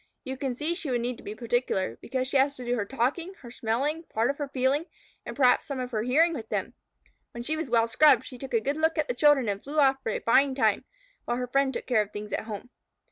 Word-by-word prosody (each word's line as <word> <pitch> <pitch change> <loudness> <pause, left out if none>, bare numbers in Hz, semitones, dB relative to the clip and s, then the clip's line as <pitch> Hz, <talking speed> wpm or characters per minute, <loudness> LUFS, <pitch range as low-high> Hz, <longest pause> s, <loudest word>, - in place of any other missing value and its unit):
You 265 -2 -5
can 260 -2 -3
see 305 +6 -1
she 340 -4 -4
would 245 -2 0
need 245 0 -2
to - - -14
be 210 - -6
particular, 235 - -1
because 255 -1 -2
she 280 - -5
had 270 +2 +4
to 255 -3 -8
do 240 +1 0
her 215 -4 -2
talking, 270 - -2
her 240 - -10
smelling, 265 +8 -1
part 230 +4 +1
of 280 - -12
her 290 - -2
feeling, 275 +4 0 0.4
and - - -5
perhaps 255 -3 +4
some 275 -2 -4
of 250 0 -4
her 215 -3 -1
hearing 305 +9 +3
with 225 -7 -6
them. - - -2 0.6
When 235 - -6
she 310 +5 -1
was 315 -4 -4
well 230 -1 +4
scrubbed, 260 +1 +5
she 250 - -10
took 265 -2 -4
a 225 - +3
good 280 +5 -1
look 320 +1 +1
at 305 - +1
the - - -1
children 280 -1 +4
and 200 -1 -2
flew 295 +3 -6
off 270 -2 +4
for - - -3
a - - -1
fine 270 +3 +3
time, 265 - +2 0.4
while 240 - -1
her 250 - -2
friend 275 +2 +1
took - - -5
care 245 -4 +3
of 205 - -4
things 210 0 -7
at - - -2
home. 220 +3 -7
255 Hz, 270 wpm, -27 LUFS, 235-285 Hz, 0.6 s, scrubbed